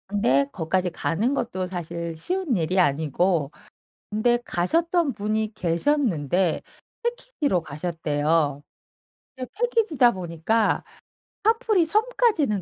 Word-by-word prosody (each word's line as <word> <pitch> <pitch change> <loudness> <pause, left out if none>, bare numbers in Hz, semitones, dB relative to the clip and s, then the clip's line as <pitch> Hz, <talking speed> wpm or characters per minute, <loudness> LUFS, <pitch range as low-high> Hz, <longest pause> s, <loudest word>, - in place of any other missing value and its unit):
근데 140 -9 +2
거기까지 180 +2 -1
가는 195 +8 -1
것도 190 -9 -2
사실 170 -2 -5
쉬운 355 - -1
일이 180 +1 +1
아니고 155 0 +1 0.6
근데 225 +3 +2
가셨던 330 - +1
분이 215 +1 -2
계셨는데 180 - +1 0.4
패키지로 475 - -1
가셨대요. 150 -2 -1 0.7
근데 255 -2 -6
패키지다 440 - +3
보니까 185 +4 0 0.6
카프리 445 -4 +3
섬까지는 420 - +1
195 Hz, 255 characters per minute, -24 LUFS, -, 0.7 s, 패키지다